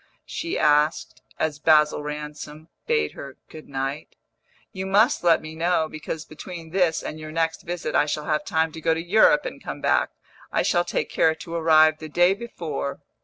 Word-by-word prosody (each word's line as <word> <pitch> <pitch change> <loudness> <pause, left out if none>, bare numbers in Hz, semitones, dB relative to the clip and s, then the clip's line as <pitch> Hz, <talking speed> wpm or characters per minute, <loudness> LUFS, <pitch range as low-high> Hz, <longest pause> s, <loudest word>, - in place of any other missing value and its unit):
she 335 +2 -4
asked, 150 +1 +2 0.2
as 150 -2 -2
Basil 150 -1 +4
Ransom 150 +1 -7 0.2
bade 455 -1 +1
her 140 -1 -10
good 155 - -12
night. 135 +2 -4 0.6
"You 190 0 -5
must 210 +6 +3
let 170 -2 +4
me 155 0 -8
know, 165 0 +1
because 155 0 -6
between 165 +1 -9
this 180 -3 +1
and 155 - -6
your 155 0 -8
next 165 0 -1
visit 170 -3 -4
I 150 - +3
shall 150 0 -3
have 150 -1 0
time 160 0 0
to 160 - -9
go 165 0 +2
to - - -3
Europe 220 +11 +4
and - - -7
come - - -6
back. - - +2 0.4
I - - +1
shall 175 0 +2
take - - -2
care 160 0 +3
to 165 +2 -9
arrive 155 -1 +4
the 155 - -8
day 175 +4 +4
before." 165 -10 -5
160 Hz, 185 wpm, -24 LUFS, 150-175 Hz, 0.6 s, Basil